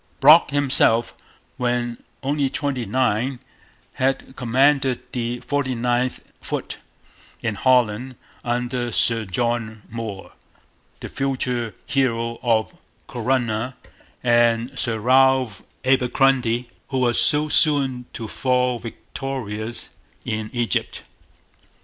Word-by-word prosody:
Brock 150 +4 +7
himself, 130 -5 +3 0.4
when 120 -1 -1 0.2
only 140 0 0
twenty 130 -4 -2
nine, 125 +2 0 0.5
had 130 0 -1
commanded 130 +1 +2
the 120 0 -3
49th 125 -3 -1 0.2
Foot - - -5 0.6
in 110 - 0
Holland 125 +2 +2 0.3
under 120 0 -2
Sir 115 0 +2
John 110 +2 -2
Moore, 110 -4 -6 0.7
the - - -5
future 125 -5 -2
hero 115 -4 0
of 115 -3 +1 0.3
Corunna, 120 0 -1 0.5
and 120 +1 +3
Sir 115 -2 0
Ralph 130 -1 +3 0.2
Abercromby, 125 -2 +2 0.2
who 135 - -3
was 120 -2 +2
so 150 +1 +3
soon 140 -5 +3
to 115 - -6
fall 125 0 0
victorious 115 -1 -6 0.3
in 110 0 -3
Egypt. 120 -5 -1
125 Hz, 95 wpm, -22 LUFS, 115-130 Hz, 0.7 s, Brock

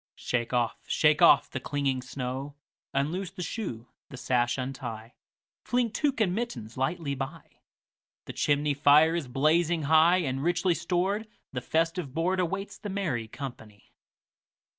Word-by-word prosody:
Shake 120 -2 -2
off, 120 -2 0
shake - - +3
off - - +6
the - - -3
clinging 140 -3 -1
snow; 130 +2 -5 0.4
Unloose 165 +7 -1
the 180 - -7
shoe, 125 - -5 0.2
the 135 - -9
sash 120 -1 +1
untie, 125 -4 -6 0.5
Fling 245 -2 0
tuque 275 +1 0
and 195 -5 +2
mittens 130 - -4
lightly 140 +3 -1
by; 140 +4 -7 0.7
The - - -7
chimney 145 0 +1
fire 150 +3 +5
is 170 -5 -2
blazing 155 +5 +2
high, 160 +4 +5
And, 135 -2 -2
richly 175 +1 +2
stored, 185 +5 -1 0.3
the 125 - -3
festive 165 -1 -1
boardAwaits 185 +3 -1
the 205 - -5
merry 170 - -2
company. 110 -5 -9
145 Hz, 140 wpm, -28 LUFS, 130-175 Hz, 0.7 s, off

